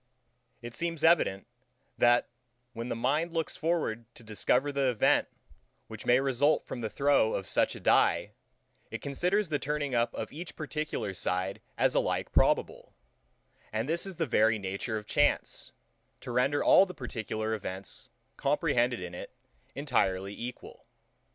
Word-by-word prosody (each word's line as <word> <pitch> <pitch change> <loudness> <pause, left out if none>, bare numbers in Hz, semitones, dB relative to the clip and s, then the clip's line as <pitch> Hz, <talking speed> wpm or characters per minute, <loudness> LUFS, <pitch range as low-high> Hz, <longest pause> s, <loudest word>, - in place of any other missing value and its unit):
It 120 0 -7
seems 165 +2 -3
evident, 160 - +3 0.5
that, 120 0 +4 0.5
when 115 +1 -5
the - - -1
mind 150 +8 0
looks 165 -1 -1
forward 155 -9 -1
to 120 - -12
discover 125 +6 +1
the 140 -2 +1
event, 120 -4 +3 0.6
which - - -10
may 125 +1 +5
result 135 +2 +2
from 125 - -6
the 110 - -2
throw 140 -5 +2
of 95 - -3
such - - +1
a - - -8
dye, - - +3 0.6
it - - -7
considers 180 +8 0
the 145 -2 0
turning 145 -1 -2
up 120 0 +2
of - - -5
each 170 +3 -8
particular 155 -9 -3
side 90 +1 -2 0.2
as - - +3
alike - - 0
probable; - - +1 0.8
and 110 +3 -2
this 170 +5 -1
is 190 - -5
the 165 - 0
very 110 -3 +3
nature 100 +3 -3
of 105 - -7
chance, - - 0 0.5
to - - -6
render 130 +4 +2
all 195 - +6
the 180 - -9
particular 110 -1 -4
events, 95 -3 -6 0.3
comprehended 130 - +1
in 90 -1 -6
it, 95 - -8 0.4
entirely 100 -9 0
equal. 120 +4 -8
125 Hz, 150 wpm, -30 LUFS, 110-150 Hz, 0.8 s, all